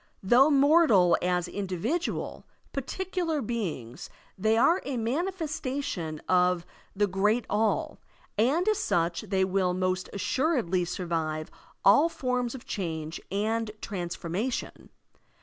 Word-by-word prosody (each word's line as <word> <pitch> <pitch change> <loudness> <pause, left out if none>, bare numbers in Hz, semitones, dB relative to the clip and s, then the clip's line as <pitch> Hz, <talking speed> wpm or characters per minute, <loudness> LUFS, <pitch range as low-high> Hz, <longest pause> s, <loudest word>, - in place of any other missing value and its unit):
Though 245 +9 +6
mortal 280 - +5
as 180 -1 0
individual, 195 - -3 0.3
particular 340 +3 -2
beings, 195 - -4 0.3
they 220 +3 +2
are 340 +10 +4
a 275 -3 -3
manifestation 275 - -2
of 180 -1 +3 0.3
the 205 +1 +3
Great 205 +4 +1
All, 215 +1 0 0.4
and 275 - +2
as 430 -1 +2
such 170 - 0
they 195 -3 +1
will 185 -1 +1
most 185 0 -1
assuredly 205 - 0
survive 160 -3 -3 0.3
all 285 +12 +6
forms 250 -4 -2
of 255 - -10
change 160 -5 -4
and 220 +3 0
transformation. 180 +5 -4
210 Hz, 110 wpm, -28 LUFS, 180-275 Hz, 0.4 s, Though